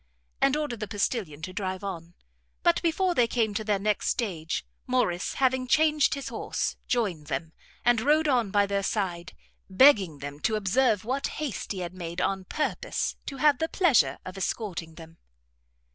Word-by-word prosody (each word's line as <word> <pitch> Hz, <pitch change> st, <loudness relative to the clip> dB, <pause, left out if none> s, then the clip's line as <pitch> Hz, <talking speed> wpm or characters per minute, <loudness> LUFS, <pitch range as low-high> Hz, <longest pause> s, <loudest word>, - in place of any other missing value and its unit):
And 275 Hz, +2 st, +4 dB
ordered 290 Hz, -7 st, -3 dB
the 215 Hz, -, -4 dB
postilion 195 Hz, -, -2 dB
to 185 Hz, -, -5 dB
drive 185 Hz, 0 st, -3 dB
on. 175 Hz, -3 st, -6 dB, 0.5 s
But -, -, +3 dB
before 355 Hz, +2 st, +1 dB
they 245 Hz, -7 st, +3 dB
came 225 Hz, -3 st, 0 dB
to 215 Hz, +1 st, -2 dB
their 210 Hz, -1 st, +1 dB
next 210 Hz, +1 st, 0 dB
stage, 170 Hz, -9 st, -2 dB, 0.2 s
Morrice 245 Hz, -9 st, 0 dB
having 260 Hz, -1 st, +1 dB
changed 305 Hz, +2 st, +3 dB
his 275 Hz, -, -5 dB
horse, -, -, -2 dB
joined 190 Hz, -11 st, -1 dB
them, 160 Hz, +3 st, -3 dB, 0.3 s
and 240 Hz, -2 st, +4 dB
rode 305 Hz, +5 st, +3 dB
on 245 Hz, -7 st, +2 dB
by 205 Hz, +1 st, +3 dB
their 200 Hz, 0 st, -1 dB
side, 180 Hz, -4 st, -2 dB, 0.4 s
begging 190 Hz, -, +5 dB
them 145 Hz, +1 st, -7 dB
to 220 Hz, -, 0 dB
observe 215 Hz, +1 st, +2 dB
what 265 Hz, +4 st, -1 dB
haste 295 Hz, -8 st, -4 dB
he 190 Hz, -3 st, -3 dB
had 175 Hz, 0 st, -5 dB
made 175 Hz, -1 st, -6 dB
on 190 Hz, 0 st, -1 dB
purpose 310 Hz, -, -2 dB
to 275 Hz, -, -5 dB
have 290 Hz, -1 st, +4 dB
the 320 Hz, -, -1 dB
pleasure 350 Hz, -, +3 dB
of 185 Hz, -, -7 dB
escorting 180 Hz, -5 st, -3 dB
them. 165 Hz, 0 st, -13 dB
210 Hz, 175 wpm, -27 LUFS, 180-260 Hz, 0.5 s, begging